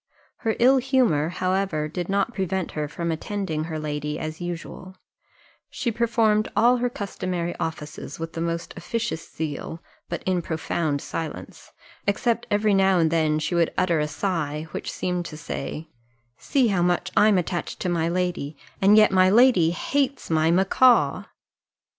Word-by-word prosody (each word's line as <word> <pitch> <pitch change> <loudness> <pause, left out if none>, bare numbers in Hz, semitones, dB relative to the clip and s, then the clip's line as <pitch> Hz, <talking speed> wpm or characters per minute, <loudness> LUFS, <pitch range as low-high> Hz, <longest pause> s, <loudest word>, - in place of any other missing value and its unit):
Her 225 -2 -1
ill 260 +3 +5
humour, 250 - +2
however, 185 -4 -1
did 175 +3 -5
not 200 +4 0
prevent 190 -3 -2
her 150 -1 -3
from 170 +3 -3
attending 160 -2 -3
her 160 -1 -4
lady 150 0 -3
as 155 +2 -6
usual; 175 +2 -6 0.7
she 240 -2 -2
performed 225 -2 +2
all 240 +3 +5
her 245 0 0
customary 185 -5 -4
offices 160 -2 -5
with 165 0 -6
the 165 - -4
most 170 0 -3
officious 220 -1 -4
zeal 160 +1 -5 0.3
but 170 - -4
in 185 -2 0
profound 160 -2 -2
silence, 160 -2 -6 0.4
except 235 +3 0
every 210 0 +2
now 195 -1 +4
and 165 -2 +2
then 155 -2 +2
she 155 +3 -2
would 170 -1 +1
utter 170 -3 +2
a 150 - 0
sigh, 150 -1 -2
which - - -5
seemed 180 -1 -2
to 155 - -8
say, 155 0 -5 0.5
"See 255 - +1
how 190 -3 +1
much 175 0 +1
I'm 210 -2 +5
attached 175 0 -3
to - - -1
my 165 -1 0
lady, 175 -4 -2 0.2
and 200 +2 +6
yet 215 -2 +6
my 185 -1 +5
lady 215 -6 +5
hates 275 +6 -1
my 160 0 +3
macaw!" 195 +8 +4
175 Hz, 160 wpm, -24 LUFS, 160-205 Hz, 0.7 s, and